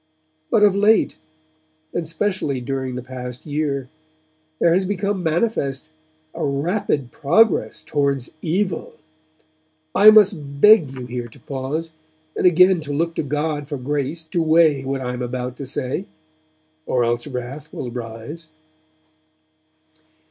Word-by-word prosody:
'But 220 Hz, -3 st, +3 dB
of 205 Hz, -2 st, +5 dB
late, 210 Hz, +2 st, +3 dB, 0.7 s
and 170 Hz, -2 st, -2 dB
specially 165 Hz, -5 st, -1 dB
during 130 Hz, 0 st, -3 dB
the 125 Hz, -, -5 dB
past 125 Hz, -1 st, -8 dB
year, 145 Hz, -3 st, -2 dB, 0.7 s
there 170 Hz, +1 st, +3 dB
has 190 Hz, +2 st, +2 dB
become 200 Hz, 0 st, -1 dB
manifest 160 Hz, -, -1 dB, 0.4 s
a -, -, -4 dB
rapid 145 Hz, -, -1 dB
progress 190 Hz, +9 st, +2 dB
towards 140 Hz, -3 st, -1 dB
evil. 180 Hz, +1 st, -1 dB, 1.0 s
(I 210 Hz, +2 st, +8 dB
must 185 Hz, -10 st, +4 dB
beg 210 Hz, -5 st, +7 dB
you 130 Hz, -2 st, -7 dB
here 120 Hz, -1 st, -5 dB
to 120 Hz, -, -17 dB
pause, 140 Hz, +6 st, -4 dB, 0.4 s
and -, -, +3 dB
again 180 Hz, +1 st, +5 dB
to 150 Hz, -2 st, -6 dB
look 165 Hz, +4 st, 0 dB
to -, -, -1 dB
God 150 Hz, 0 st, -2 dB
for 145 Hz, -1 st, -4 dB
grace 145 Hz, +4 st, -2 dB
to 170 Hz, -, 0 dB
weigh 160 Hz, -3 st, +4 dB
what 135 Hz, 0 st, -3 dB
I 125 Hz, -1 st, -3 dB
am 125 Hz, -, -5 dB
about 125 Hz, 0 st, -4 dB
to 140 Hz, -, -6 dB
say; 135 Hz, +7 st, -3 dB, 0.8 s
or 125 Hz, -, +2 dB
else 120 Hz, +2 st, -1 dB
wrath 130 Hz, +2 st, -6 dB
will 120 Hz, -, -5 dB
rise.) 120 Hz, +7 st, -7 dB
145 Hz, 135 wpm, -21 LUFS, 130-170 Hz, 1.0 s, I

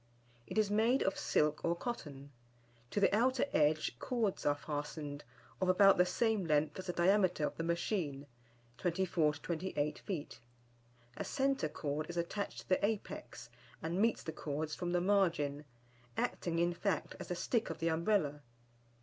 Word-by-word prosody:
It -, -, -5 dB
is 210 Hz, -2 st, +3 dB
made 225 Hz, +5 st, +3 dB
of 195 Hz, -, +1 dB
silk 150 Hz, 0 st, +1 dB
or 170 Hz, 0 st, +2 dB
cotton. 145 Hz, -, -6 dB, 0.6 s
To 205 Hz, -, -1 dB
the 200 Hz, 0 st, +4 dB
outer 255 Hz, +3 st, +3 dB
edge 150 Hz, -5 st, +2 dB
cords 225 Hz, -10 st, -1 dB
are 145 Hz, -, +4 dB
fastened, 145 Hz, 0 st, -5 dB, 0.4 s
of 185 Hz, -, +2 dB
about 195 Hz, 0 st, +6 dB
the 180 Hz, -, +5 dB
same 220 Hz, +2 st, +1 dB
length 155 Hz, +1 st, +1 dB
as 185 Hz, -, -6 dB
the 180 Hz, -, -1 dB
diameter 180 Hz, -3 st, +3 dB
of -, -, -3 dB
the 165 Hz, -, -3 dB
machine 170 Hz, -4 st, -1 dB, 0.5 s
(24 175 Hz, -4 st, +1 dB
to 145 Hz, -, -12 dB
28 160 Hz, -3 st, -2 dB
feet). 170 Hz, -7 st, -5 dB, 0.8 s
A -, -, -2 dB
centre 270 Hz, -, 0 dB
cord 150 Hz, +1 st, -3 dB
is 175 Hz, -, -5 dB
attached 185 Hz, +4 st, -3 dB
to -, -, -20 dB
the 185 Hz, -, +2 dB
apex 195 Hz, -, -3 dB, 0.3 s
and 170 Hz, +4 st, 0 dB
meets 230 Hz, +1 st, +2 dB
the 160 Hz, -, -4 dB
cords 150 Hz, 0 st, -3 dB
from 175 Hz, -1 st, -3 dB
the 175 Hz, 0 st, +2 dB
margin, 170 Hz, -7 st, +1 dB, 0.5 s
acting, 170 Hz, -1 st, -1 dB
in 175 Hz, +1 st, +2 dB
fact, 180 Hz, -1 st, -1 dB
as -, -, -6 dB
the 180 Hz, -, -2 dB
stick 230 Hz, +6 st, 0 dB
of -, -, -4 dB
the 165 Hz, -, 0 dB
Umbrella. 160 Hz, -3 st, +1 dB
170 Hz, 165 wpm, -35 LUFS, 150-200 Hz, 0.8 s, about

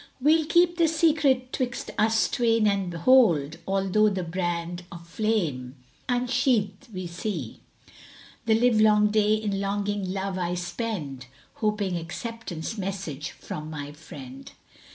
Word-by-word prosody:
We'll 305 Hz, +3 st, +3 dB
keep 345 Hz, +1 st, +4 dB
the 335 Hz, -2 st, +4 dB
secret 300 Hz, -5 st, +2 dB
'twixt 250 Hz, -2 st, -3 dB
us 220 Hz, +1 st, +3 dB
twain 230 Hz, -4 st, +2 dB
and 195 Hz, -3 st, +1 dB
hold 170 Hz, -, +4 dB
* -, -, -30 dB
Although 195 Hz, +2 st, +2 dB
the 190 Hz, -2 st, -2 dB
brand 175 Hz, 0 st, -3 dB
of 170 Hz, 0 st, -12 dB
blame 160 Hz, -, -1 dB, 0.3 s
unsheathed 245 Hz, -3 st, +1 dB
we 185 Hz, -2 st, -5 dB
see. 170 Hz, -, -5 dB, 0.9 s
The 220 Hz, 0 st, +4 dB
livelong 215 Hz, -3 st, +4 dB
day 215 Hz, 0 st, +3 dB
in 205 Hz, -2 st, -2 dB
longing 200 Hz, -1 st, -2 dB
love 190 Hz, -1 st, -3 dB
I 175 Hz, 0 st, -1 dB
spend 175 Hz, -, -4 dB
* -, -, -31 dB
Hoping 210 Hz, -4 st, 0 dB
acceptance 200 Hz, +2 st, -6 dB
message 185 Hz, -7 st, -4 dB
from 155 Hz, 0 st, -7 dB
my 145 Hz, -2 st, -6 dB
friend." 135 Hz, -3 st, -11 dB
200 Hz, 135 wpm, -26 LUFS, 170-225 Hz, 0.9 s, keep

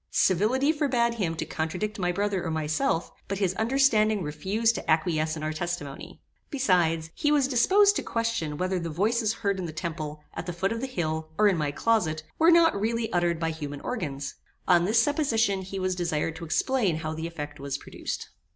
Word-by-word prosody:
Civility 230 Hz, -, +3 dB
forbad 250 Hz, -6 st, +1 dB
him 185 Hz, -8 st, -2 dB
to -, -, -3 dB
contradict 180 Hz, +7 st, -3 dB
my 180 Hz, -1 st, +1 dB
brother 200 Hz, 0 st, -1 dB
or 170 Hz, -, -2 dB
myself, 160 Hz, -, 0 dB, 0.2 s
but 200 Hz, -, -2 dB
his 190 Hz, -2 st, +1 dB
understanding 220 Hz, -3 st, +2 dB
refused 195 Hz, +10 st, 0 dB
to -, -, -6 dB
acquiesce 155 Hz, 0 st, +1 dB
in 155 Hz, -, -6 dB
our 155 Hz, 0 st, -1 dB
testimony. 165 Hz, -4 st, -5 dB, 0.3 s
Besides, 175 Hz, -, +1 dB
he 295 Hz, -, 0 dB
was 285 Hz, -3 st, +3 dB
disposed 395 Hz, -, +4 dB
to -, -, -1 dB
question 230 Hz, -10 st, -2 dB
whether 185 Hz, +1 st, 0 dB
the 170 Hz, -1 st, -4 dB
voices 215 Hz, +7 st, +1 dB
heard 200 Hz, -3 st, -1 dB
in 180 Hz, -, -3 dB
the -, -, -5 dB
temple, 155 Hz, -2 st, -5 dB
at 165 Hz, +1 st, -6 dB
the 175 Hz, -, -3 dB
foot 190 Hz, +4 st, -1 dB
of 230 Hz, 0 st, -3 dB
the 265 Hz, -, -2 dB
hill, 160 Hz, -8 st, -3 dB
and 210 Hz, -1 st, +5 dB
in -, -, 0 dB
my 150 Hz, -2 st, 0 dB
closet, 160 Hz, -2 st, 0 dB, 0.2 s
were 325 Hz, +1 st, +6 dB
not 330 Hz, -11 st, +5 dB
really 230 Hz, +1 st, -1 dB
uttered 175 Hz, -2 st, +1 dB
by 165 Hz, -1 st, 0 dB
human 145 Hz, -3 st, -6 dB
organs. 145 Hz, -, -4 dB, 0.3 s
On 175 Hz, -1 st, +5 dB
this 220 Hz, +4 st, +3 dB
supposition 225 Hz, -8 st, +2 dB
he 190 Hz, +1 st, -6 dB
was 185 Hz, 0 st, 0 dB
desired 165 Hz, -3 st, -1 dB
to 170 Hz, -, -7 dB
explain 210 Hz, -, +1 dB
how 155 Hz, 0 st, -3 dB
the 160 Hz, +1 st, -4 dB
effect 150 Hz, -3 st, -7 dB
was 140 Hz, 0 st, -3 dB
produced. -, -, -6 dB
185 Hz, 195 wpm, -27 LUFS, 160-230 Hz, 0.3 s, were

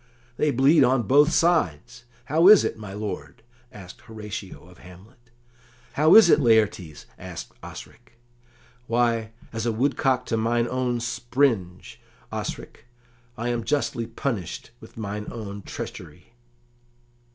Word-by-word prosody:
"They 150 Hz, -, +1 dB
bleed 140 Hz, +3 st, +4 dB
on 130 Hz, -1 st, +2 dB
both 145 Hz, +8 st, +4 dB
sides. 120 Hz, -, 0 dB, 0.2 s
How 160 Hz, +6 st, +3 dB
is 210 Hz, -1 st, +8 dB
it, -, -, -2 dB
my 105 Hz, -3 st, -9 dB
lord?" 105 Hz, +2 st, -7 dB, 0.3 s
asked 95 Hz, -7 st, -12 dB
Horatio 105 Hz, -5 st, -9 dB
of 90 Hz, -1 st, -18 dB
Hamlet. 105 Hz, +7 st, -17 dB, 0.6 s
"How 155 Hz, +3 st, +5 dB
is 220 Hz, -4 st, +9 dB
it, 160 Hz, -, +5 dB
Laertes?" 105 Hz, -, +1 dB
asked -, -, -8 dB
Osric. -, -, -12 dB, 0.7 s
"Why, 115 Hz, -1 st, 0 dB, 0.2 s
as 115 Hz, +1 st, -3 dB
a -, -, +1 dB
woodcock 130 Hz, +2 st, 0 dB
to 115 Hz, -, -1 dB
mine 115 Hz, +1 st, 0 dB
own 125 Hz, -2 st, -2 dB
springe, 120 Hz, -6 st, -1 dB, 0.5 s
Osric; -, -, -7 dB, 0.5 s
I 120 Hz, +2 st, -3 dB
am 120 Hz, -1 st, -2 dB
justly 115 Hz, -4 st, -1 dB
punished 115 Hz, -, -5 dB
with -, -, -16 dB
mine 105 Hz, -1 st, -5 dB
own 100 Hz, -3 st, -7 dB
treachery." 115 Hz, +4 st, -9 dB
115 Hz, 130 wpm, -24 LUFS, 105-130 Hz, 0.7 s, is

